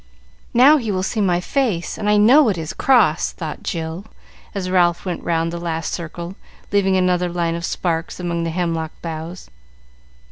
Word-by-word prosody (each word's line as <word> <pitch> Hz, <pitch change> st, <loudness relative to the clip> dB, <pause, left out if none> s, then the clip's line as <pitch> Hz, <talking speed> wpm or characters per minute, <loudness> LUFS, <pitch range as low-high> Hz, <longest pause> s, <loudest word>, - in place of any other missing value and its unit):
"Now 275 Hz, +6 st, +7 dB
he 230 Hz, -7 st, -2 dB
will 185 Hz, -1 st, -1 dB
see 215 Hz, +3 st, -1 dB
my 180 Hz, -3 st, +2 dB
face, 210 Hz, -4 st, -1 dB
and 210 Hz, -1 st, -2 dB
I 210 Hz, -, +4 dB
know 245 Hz, +6 st, +6 dB
it 195 Hz, -, -1 dB
is 160 Hz, +2 st, -5 dB
cross," 215 Hz, -, +3 dB
thought 155 Hz, -3 st, -6 dB
Jill, 165 Hz, +3 st, -4 dB, 0.5 s
as 190 Hz, -2 st, -2 dB
Ralph 175 Hz, -1 st, +2 dB
went 180 Hz, -2 st, -3 dB
round 165 Hz, 0 st, 0 dB
the 170 Hz, -, -4 dB
last 165 Hz, -1 st, -3 dB
circle, 170 Hz, +1 st, -6 dB, 0.4 s
leaving 195 Hz, -2 st, +2 dB
another 180 Hz, -1 st, +1 dB
line 170 Hz, -1 st, -1 dB
of 170 Hz, 0 st, -4 dB
sparks 165 Hz, -2 st, -2 dB
among 170 Hz, -1 st, -2 dB
the 165 Hz, -, -1 dB
hemlock 165 Hz, -2 st, -2 dB
boughs. 165 Hz, -, -7 dB
175 Hz, 175 wpm, -20 LUFS, 165-195 Hz, 0.5 s, Now